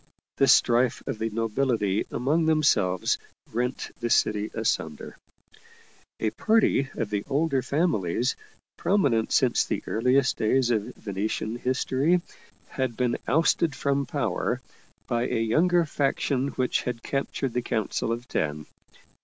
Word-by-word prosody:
The 135 - +4
strife 120 -1 +4
of 110 - -4
the 110 0 -1
nobility 115 -2 0
among 150 +7 +1
themselves 110 - +2 0.3
rent 125 +3 -2
the 120 0 -2
city 105 -1 +2
asunder. 80 -9 -2 1.0
A 110 - 0
party 215 - +2
of 110 -3 -3
the 100 -1 -1
older 140 -1 +1
families, 125 - 0 0.4
prominent 140 - +1
since - - +3
the - - -3
earliest 125 +4 +2
days 120 +2 +2
of 110 -3 -1
Venetian 105 +2 -3
history, 130 +6 +1 0.5
had 130 -4 -3
been 125 -2 0
ousted 160 +1 +2
from 140 0 0
power - - -1 0.5
by 120 +1 0
a - - -1
younger 170 +10 +3
faction 140 -2 0
which 130 -2 0
had 120 -2 -4
captured 135 -2 -2
the 125 - 0
Council 110 -1 -2
of 120 +1 -4
Ten. 75 -5 -2
125 Hz, 130 wpm, -26 LUFS, 110-140 Hz, 1.0 s, The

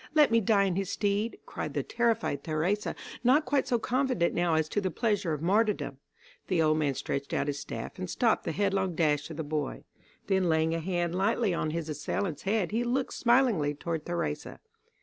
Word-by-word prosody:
Let 300 -5 +6
me 230 0 +4
die 200 -1 +3
in 190 -2 0
his 195 -2 -1
stead," 205 +3 0
cried - - -5
the - - 0
terrified 230 - 0
Theresa, 170 +7 -1 0.3
not 265 +6 +4
quite 275 +2 +1
so 240 - +2
confident 250 -6 +1
now 175 -2 +2
as 160 -1 +1
to 205 - 0
the 190 - 0
pleasure 205 -2 0
of 150 0 -3
martyrdom. 185 -8 +1 0.5
The 180 -3 +1
old 155 -1 +3
man 145 -3 +1
stretched 140 +2 -3
out - - +1
his 145 -1 -2
staff - - -6
and 185 -1 -4
stopped 230 +5 +2
the - - -1
headlong 190 0 0
dash 150 -2 +1
of 160 - -7
the 160 - -2
boy. 150 -2 -3 0.4
Then 190 -2 +2
laying 160 0 +2
a 165 - -1
hand 175 0 -1
lightly 200 +2 +1
on 155 - -1
his 165 0 -3
assailant's 155 +2 -3
head 200 -2 0
he 230 +3 +1
looked 250 +2 -1
smilingly 235 - +3
toward 160 +1 -4
Theresa. 160 -4 -3
180 Hz, 200 wpm, -29 LUFS, 155-220 Hz, 0.5 s, Let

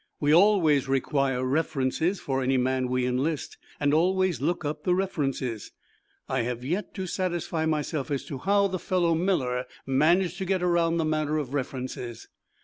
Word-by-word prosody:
We 145 0 +3
always 165 -7 +4
require 135 -1 0
references 155 +5 0
for 135 -1 -2
any 130 +1 +2
man 130 0 +1
we 125 0 0
enlist, 135 +5 -2 0.2
and 145 0 +2
always 185 0 +2
look 170 +2 -1
up 145 +1 -3
the 180 - +2
references. 135 - -2 0.5
I 130 -1 0
have 120 +1 -3
yet 180 +9 -3
to 190 -3 -3
satisfy 175 -3 -2
myself 150 -1 -1
as 140 -2 -2
to 135 - -6
how 200 +3 +3
the 185 -1 -3
fellow 175 -2 +1
Miller 130 -8 0 0.2
managed 170 +7 +2
to 190 - -2
get 185 -1 0
around 170 -1 +2
the 165 - +1
matter 155 0 0
of 140 -3 -3
references. 125 -3 -5
155 Hz, 165 wpm, -27 LUFS, 130-175 Hz, 0.5 s, always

